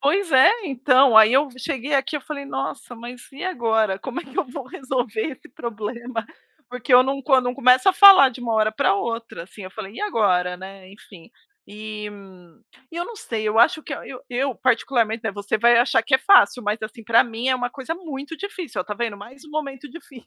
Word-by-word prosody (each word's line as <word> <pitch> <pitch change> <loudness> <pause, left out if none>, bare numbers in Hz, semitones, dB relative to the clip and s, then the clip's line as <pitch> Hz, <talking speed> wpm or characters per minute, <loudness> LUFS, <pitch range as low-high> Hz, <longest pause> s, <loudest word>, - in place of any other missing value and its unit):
Pois 330 +6 0
é, 265 +7 +7 0.2
então, 260 -3 +3
aí 220 +1 +8
eu 275 +3 +3
cheguei 280 0 -3
aqui, 275 +2 0
eu - - -6
falei: 280 0 -7
"Nossa, 270 -2 -6
mas 240 +1 -10
e 275 - -10
agora? 225 - 0
Como 260 +6 -6
é - - -12
que 270 +4 -11
eu 375 - +1
vou 265 +2 -8
resolver 255 -1 -3
esse 260 - -15
problema?". 235 0 -6 0.5
Porque 250 +1 -4
eu 250 - +8
não 270 +1 -3
eu 265 -3 +5
não 245 0 -3
começo 255 +2 +4
a - - +5
falar 385 -8 +8
de 250 0 -11
uma 235 -2 -3
hora 215 0 +2
pra 205 - +1
outra, 230 -3 -5
assim, 190 +3 -14
eu 185 - -9
falei: 200 0 -9
"E - - -8
agora, 185 - 0
né", 190 0 -12
enfim. 200 -1 -17 0.4
E 210 0 -8 0.9
e 335 - -9
eu 345 - -2
não 465 +4 -10
sei, 225 - -5
eu 215 +1 0
acho 315 - +4
que 295 - -8
eu 265 -2 -8
eu 260 +2 -1
particularmente, 230 -2 0
né, 220 - -2
você 205 +1 -3
vai 235 +2 +5
achar 240 -1 +3
que 265 +4 0
é 265 - +5
fácil, 250 - +4
mas, 210 +1 -2
assim, 220 +1 -8
pra 230 +2 +4
mim 235 +2 -4
é 260 - +3
uma 245 0 -3
coisa 270 +4 -6
muito 310 -3 -8
difícil. 360 - -6
Ó, - - -4
tá 210 - -6
vendo, 225 -1 -4
mais 255 +9 -14
um 305 - -15
momento 295 -2 -6
difícil. 275 -7 -14
250 Hz, 220 wpm, -22 LUFS, 220-275 Hz, 0.9 s, aí